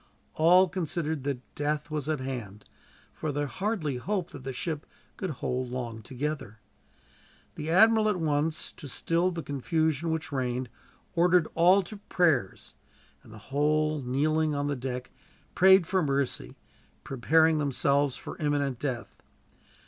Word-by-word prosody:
All 180 +4 +6
considered 160 -4 -2
that 135 -3 -4
death 150 +1 -2
was 150 -1 -2
at 155 -2 0
hand, 115 -6 -6 0.5
for 155 - -3
they 145 +1 -1
hardly 175 - -2
hoped 185 +6 -2
that 140 - -10
the 135 - -4
ship 155 +3 -4 0.3
could 190 - -4
hold 130 -3 -3
long 120 -3 -5
together. 130 -2 -4 1.0
The 155 +1 -5
admiral 220 +4 +5
at 195 -4 0
once, 155 0 -1
to 145 - -10
still 165 +6 0
the 170 -3 -5
confusion 155 +3 0
which 160 -1 -2
reigned, 125 -2 -2 0.4
ordered 175 -1 +4
all 180 +4 +5
to 210 +4 -8
prayers; 165 - 0 0.5
and - - -16
the 110 - -10 0.2
whole, 155 +1 +2
kneeling 150 +4 +1
on 145 0 -1
the 145 0 -1
deck, 125 0 -5 0.4
prayed 190 -1 +6
for 185 +2 +1
mercy, 140 -3 -1 0.5
preparing 160 +5 +3
themselves 140 -1 +1
for - - -8
imminent 145 -4 0
death. 130 -5 -4
150 Hz, 140 wpm, -28 LUFS, 135-165 Hz, 1.0 s, All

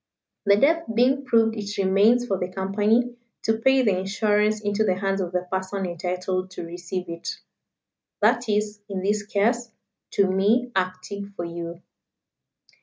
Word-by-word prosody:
The 200 - +7
death 330 +8 +3
being 260 +4 +2
proved 225 -3 +3
it 205 -1 -5
remains 200 +5 +4
for 195 -5 -1
the 180 0 -3
Company 210 +6 +1 0.3
to 220 0 +1
pay 265 +2 +4
the 200 -5 +2
insurance 210 +2 +1
into 205 +1 0
the 190 -4 +2
hands 195 +1 -1
of 175 -2 -3
the 180 0 0
person 190 +1 -2
entitled 180 +1 -2
to 180 - -7
receive 175 +2 -5
it. 170 0 -5 0.9
That 235 +2 +2
is, 210 0 0
in 190 -2 -3
this 205 +1 +1
case, 230 +4 0 0.4
to 200 - +4
me, 205 +7 +2
acting 190 +2 -3
for 175 - -4
you." 170 +1 -6
200 Hz, 155 wpm, -24 LUFS, 185-220 Hz, 0.9 s, The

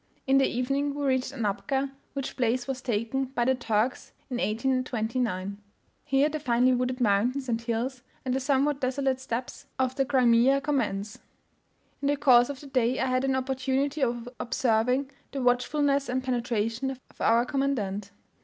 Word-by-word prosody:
In 270 0 +4
the 270 - +4
evening, 275 +3 -1
we 290 -1 -2
reached 260 -1 +1
Anapka, 245 +3 -1 0.2
which 275 -2 -4
place 245 0 0
was 265 -1 -3
taken 240 +2 -1
by 250 -2 -1
the 260 - +4
Turks 235 -1 -1 0.2
in 245 - -1
1829. 225 -4 -1 0.5
Here 275 0 +3
the 310 0 -3
finely 250 -2 +3
wooded 250 +1 -1
mountains 245 +5 +1
and 230 -1 -1
hills, 240 +3 -2 0.2
and 255 - 0
the 265 - +1
somewhat 280 +1 +1
desolate 265 0 0
steppes 255 +1 -5
{320b} 260 - +2
of 255 0 -5
the 270 - +2
Crimea 255 0 +4
commence. 230 -6 -1 0.8
In 280 - 0
the 290 0 +2
course 250 -3 +5
of 280 -2 -6
the - - -11
day 255 -2 +1
I - - +1
had 255 0 +1
an 270 -1 +1
opportunity 265 +2 -1
of 240 -2 0
observing 250 +3 +1 0.2
the 270 -2 -2
watchfulness 275 +3 +2
and 255 +1 -1
penetration 240 0 -1
of 265 -1 -6 0.2
our 230 +2 +4
commandant. 215 -8 -1
255 Hz, 165 wpm, -27 LUFS, 235-270 Hz, 0.8 s, course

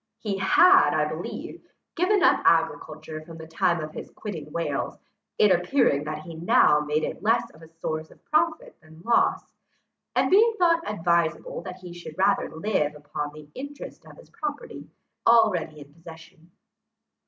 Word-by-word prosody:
He 200 -3 -4
had, 365 - +5
I - - +2
believe, - - -7 0.3
given 365 +2 +2
up - - +4
agriculture 155 -1 0
from 165 0 -12
the 160 - -9
time 170 +1 0
of 155 0 -6
his - - -8
quitting 160 -8 -8
Wales, 170 +1 -3 0.4
it 210 - +5
appearing 180 - +2
that 155 0 -5
he 170 - -9
now 165 -2 +4
made 150 +1 -1
it - - -4
less 230 +3 +1
a 160 +1 -15
source 160 -1 -5
of - - -21
profit 315 +1 0
than 160 0 -17
loss, 235 +2 +1 0.6
and - - +2
being 445 +4 +5
thought 335 -3 +3
advisable 170 -4 -1
that 185 -1 -9
he 180 -2 -9
should 175 -2 -10
rather 195 +1 +2
live 160 -4 -1
upon 145 0 -5
the 150 0 -13
interest 285 +2 -9
of - - -15
his - - -17
property 300 -4 -6 0.4
already 200 -10 +3
in 145 0 -14
possession. 165 +1 -15
170 Hz, 160 wpm, -25 LUFS, 155-235 Hz, 0.6 s, had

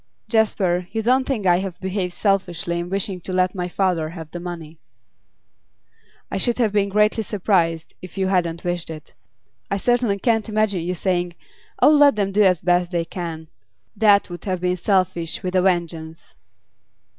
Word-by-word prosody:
'Jasper, 190 -5 +1
you 220 +1 -2
don't 255 +3 +3
think 250 -7 -1
that 180 -2 +5
I - - +3
have 190 -1 -5
behaved 190 -1 -2
selfishly 175 -4 0
in 175 +1 -4
wishing 195 -1 -2
to 185 - -6
let 185 0 +1
my 180 -2 -3
father 180 -4 0
have 160 -2 -9
the 175 - -6
money?' 165 -3 -8 1.5
'I - - -1
should 240 +5 +1
have 230 -4 +2
been 200 -1 +1
greatly 210 +2 +2
surprised 180 -6 0
if 185 +1 -11
you 190 - +1
hadn't 175 -3 0
wished 175 -1 -3
it. 155 -2 -9 0.6
I 200 - 0
certainly 240 -1 +1
can't 225 +1 0
imagine 215 -4 +1
you 180 +2 -2
saying: 175 -1 -1 0.5
"Oh, - - +8
let 290 -4 +6
them 200 -2 0
do 205 +2 +2
as 185 -5 +4
best 175 0 +2
they 170 -2 -1
can!" 165 -2 -6 0.5
That 205 -2 +4
would 175 -1 -8
have 185 -3 -2
been 180 0 0
selfish 180 -3 0
with 185 0 -3
a 185 - +4
vengeance. 170 -3 -2
185 Hz, 180 wpm, -22 LUFS, 175-205 Hz, 1.5 s, Oh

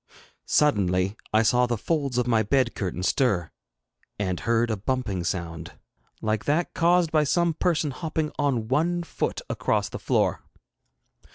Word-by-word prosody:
Suddenly 100 -8 +2 0.2
I 110 +1 +4
saw 125 +3 +3
the 120 -1 -1
folds 140 0 -1
of 125 - +2
my 115 -3 +3
bed 120 +3 +1
curtain 90 -2 -3
stir, 95 - +1 0.7
and 95 -3 -2
heard 115 0 +1
a - - +1
bumping 105 -4 -2
sound, 85 -2 -4 0.5
like 110 -1 -1
that 155 +4 0
caused 170 -1 +3
by 155 -1 +3
some 170 +3 +2
person 160 -3 0
hopping 155 +2 -3
on 130 -6 0
one 170 +7 +1
foot 170 - -3
across - - 0
the - - -6
floor. - - +1
125 Hz, 150 wpm, -25 LUFS, 100-150 Hz, 0.7 s, I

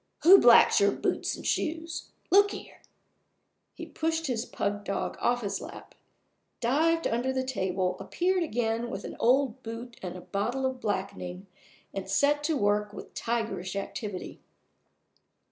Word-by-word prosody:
Who 380 +5 +10
blacks 240 -1 +7
your 200 - +5
boots - - -1
and - - -10
shoes? 325 +1 -2 0.2
Look 405 +2 +6
here!" - - -10 0.9
He - - -7
pushed 325 0 -2
his 245 -4 -1
pug 205 0 -2
dog 200 - -3
off 245 0 +1
his 200 -1 -2
lap, - - -10 0.7
dived 320 +7 +2
under 245 +3 0
the 260 0 -1
table, 185 -6 -1
appeared 365 +1 0
again 235 -5 -1
with 195 -2 -5
an - - -7
old 255 0 +2
boot 235 +1 -8
and 180 -1 -5
a 180 - -8
bottle 235 +9 -2
of 260 -1 -2
blackening, 190 -2 -3 0.5
and 195 -1 -5
set 285 +8 +2
to 315 -1 +1
work 205 -1 +1
with - - -10
tigerish 220 -6 -2
activity. 200 -1 -5
235 Hz, 145 wpm, -28 LUFS, 200-285 Hz, 0.9 s, Who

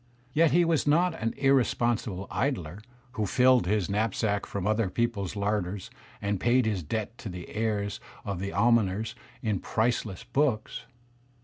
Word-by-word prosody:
Yet 165 +1 +5
he 175 +2 +4
was 165 -3 +1
not 170 +4 +4
an 115 - -1
irresponsible 120 -7 +1
idler 100 - -2 0.3
who 110 -5 -2
filled 125 -5 +4
his 105 -2 +1
knapsack 105 0 0
from 100 -2 -4
other 110 -1 +1
peoples' 105 -3 -1
larders 100 -2 -2 0.3
and 100 -1 0
paid 120 +3 +3
his 105 -4 0
debt 105 +8 -3
to 110 - -6
the 90 -1 -8
heirs 105 -2 -1 0.3
of 100 -3 -3
the 100 +1 -3
almoners 110 -2 +2 0.3
in 105 -5 0
priceless 110 -3 -1
books. 125 -3 -1
110 Hz, 145 wpm, -28 LUFS, 100-120 Hz, 0.3 s, Yet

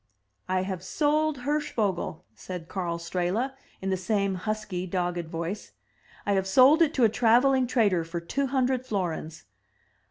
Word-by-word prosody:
"I 185 0 +1
have 190 -2 -4
sold 300 +4 +1
Hirschvogel!" 220 - -1
said 180 -3 -7
Karl 175 -3 -3
Strehla, 180 +9 -1 0.3
in 195 - -1
the 190 - +1
same 200 +1 0
husky, 190 -1 -3
dogged 175 -2 -2
voice. 170 +5 -5 0.3
" - - -26
I 205 - +2
have 190 -1 +1
sold 265 - +6
it 320 -1 +3
to 255 - +3
a - - +8
traveling 245 +4 +3
trader 205 -9 +2
for 165 +1 -4
two 275 +11 -2
hundred 260 -1 +1
florins. 170 -7 -3
200 Hz, 155 wpm, -27 LUFS, 180-255 Hz, 0.3 s, a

